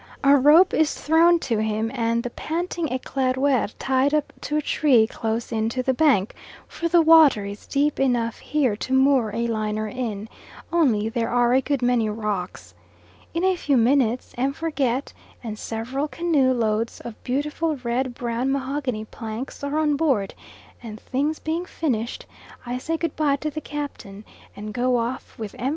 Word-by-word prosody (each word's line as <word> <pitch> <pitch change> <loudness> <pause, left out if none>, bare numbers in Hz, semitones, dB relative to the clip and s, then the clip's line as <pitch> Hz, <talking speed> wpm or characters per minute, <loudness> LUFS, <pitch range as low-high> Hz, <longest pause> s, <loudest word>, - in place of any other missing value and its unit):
A 275 +1 +6
rope 300 +7 +6
is 315 -1 +2
thrown 335 +3 +4
to 230 -4 -1
him, 220 +1 -1
and 230 -2 0
the 245 - -4
panting 335 +2 -3
Eclaireur 260 -2 0
tied 270 +2 +1
up 300 -1 -1
to 300 - -2
a - - +1
tree 265 -7 +3
close 225 +1 -3
in 220 -1 0
to 255 +2 -2
the 260 - +1
bank, 255 -8 +2 0.3
for 335 - -3
the 335 0 +4
water 310 -10 +6
is 200 +1 -8
deep 290 +1 0
enough 240 -4 0
here 270 -7 0
to 260 - -4
moor 265 -3 +4
a 230 +2 -2
liner 215 -1 -2
in, 220 -3 -4 0.5
only 240 -11 +2
there 230 0 -2
are 245 0 +2
a 260 - +4
good 275 -2 -1
many 245 -3 +2
rocks. 195 - -4 0.6
In 335 - 0
a 375 0 +3
few 285 -6 +1
minutes 245 0 +2
M. 270 +2 +1
Forget 280 -5 -2 0.3
and 215 -2 -6
several 255 +6 -3
canoe 305 -5 +1
loads 225 -2 -1
of 235 -2 -10
beautiful 300 +4 -1
red 245 +1 -1
brown 240 +2 -2
mahogany 265 -4 -2
planks 225 +5 -7
are 285 +2 -1
on 300 -2 +2
board, 265 -11 +1 0.5
and 220 -3 -8
things 290 +6 -1
being 330 +3 -3
finished, 240 -7 -3 0.4
I 245 +1 -3
say 325 +5 -2
good 330 -2 -3
bye 295 -3 +2
to 300 +2 -4
the 310 - -5
captain, 280 -10 -7 0.3
and 210 +1 -7
go 250 +2 +1
off 235 +2 -4
with 215 -3 -6
M. 255 - 0
255 Hz, 170 wpm, -23 LUFS, 225-290 Hz, 0.6 s, A